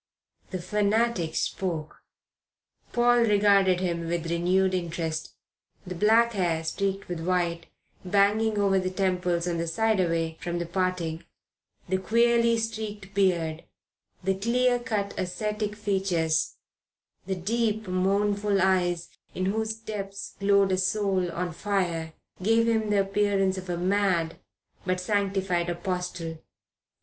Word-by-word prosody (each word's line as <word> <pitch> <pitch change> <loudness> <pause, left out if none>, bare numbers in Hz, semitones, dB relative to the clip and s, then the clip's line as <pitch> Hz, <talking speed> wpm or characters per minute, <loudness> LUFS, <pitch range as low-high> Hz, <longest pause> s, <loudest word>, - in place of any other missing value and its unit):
The 185 - -3
fanatic 205 -2 0
spoke. 165 -5 -3 0.9
Paul 240 0 +4
regarded 200 -4 +4
him 170 -2 -2
with 170 0 -2
renewed 185 +2 +2
interest. 165 -3 -3 0.5
The 180 - -5
black 225 +5 +4
hair 170 -5 0
streaked 195 +4 -2
with 175 -2 -4
white, 170 -1 -1 0.4
banging 205 +3 +2
over 195 -1 +3
the 185 0 -1
temples 180 -2 0
on 170 -1 -1
the 170 - -2
side 220 +5 +1
away 165 -2 0
from 175 0 -3
the 170 - -2
parting, 175 -2 -2 0.6
the 190 +1 0
queerly 235 +3 +3
streaked 215 -3 -4
beard, 170 -5 +1 0.6
the 190 +1 +2
clear 245 +5 +2
cut 210 -4 -2
ascetic 210 +3 -2
features, 190 -6 0 0.7
the 190 - -1
deep, 215 +3 -1
mournful 200 +2 +1
eyes 175 -2 +1 0.3
in 185 - -1
whose 220 +3 -1
depths 200 -3 -6
glowed 200 -1 +3
a 185 - +1
soul 190 -2 +1
on 175 0 -3
fire, 170 -4 -1 0.3
gave 225 +4 +3
him 220 -2 +1
the 205 -1 +3
appearance 195 -1 +1
of 185 -1 -7
a 175 - -1
mad 180 -3 +1 0.4
but 185 0 0
sanctified 190 -3 0
apostle. 175 -2 -4
190 Hz, 125 wpm, -27 LUFS, 175-210 Hz, 0.9 s, Paul